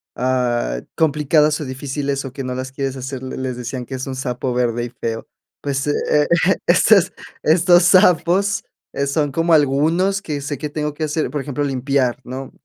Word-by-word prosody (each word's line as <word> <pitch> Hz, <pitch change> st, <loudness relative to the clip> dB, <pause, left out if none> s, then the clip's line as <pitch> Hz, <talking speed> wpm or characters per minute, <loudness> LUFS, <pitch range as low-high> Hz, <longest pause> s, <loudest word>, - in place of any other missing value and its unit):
ah, 120 Hz, -, 0 dB
complicadas 150 Hz, 0 st, +2 dB
o -, -, -4 dB
difíciles 140 Hz, +1 st, -3 dB
o 130 Hz, -, -7 dB
que 135 Hz, 0 st, -5 dB
no 125 Hz, 0 st, -4 dB
las 130 Hz, 0 st, -5 dB
quieres 135 Hz, -1 st, -3 dB
hacer, 130 Hz, 0 st, -6 dB
le 130 Hz, -, -6 dB
les 130 Hz, -1 st, -3 dB
decían 125 Hz, +1 st, -5 dB
que 130 Hz, -, -6 dB
es 130 Hz, +1 st, -5 dB
"un 135 Hz, -, -4 dB
sapo 125 Hz, -1 st, -3 dB
verde 120 Hz, -1 st, 0 dB
y -, -, -6 dB
feo". 115 Hz, -1 st, -5 dB, 0.3 s
Pues, 140 Hz, -1 st, -2 dB
eh, 145 Hz, 0 st, +1 dB
e 175 Hz, +2 st, +4 dB
estos 185 Hz, +1 st, +5 dB, 0.3 s
estos 175 Hz, +2 st, +5 dB
sapos, 185 Hz, +3 st, +4 dB, 0.3 s
eh, 140 Hz, -, -1 dB
son 145 Hz, 0 st, 0 dB
como 165 Hz, +3 st, +1 dB
algunos 160 Hz, +7 st, +2 dB
que 150 Hz, -6 st, -4 dB
sé 145 Hz, 0 st, -4 dB
que 150 Hz, -, -4 dB
tengo 150 Hz, 0 st, -3 dB
que 155 Hz, -, -4 dB
hacer, 155 Hz, +1 st, -1 dB
por 145 Hz, -, -2 dB
ejemplo, 145 Hz, +1 st, -3 dB
limpiar, 135 Hz, -2 st, 0 dB
¿no?, 130 Hz, +1 st, -7 dB
140 Hz, 190 wpm, -20 LUFS, 130-155 Hz, 0.3 s, estos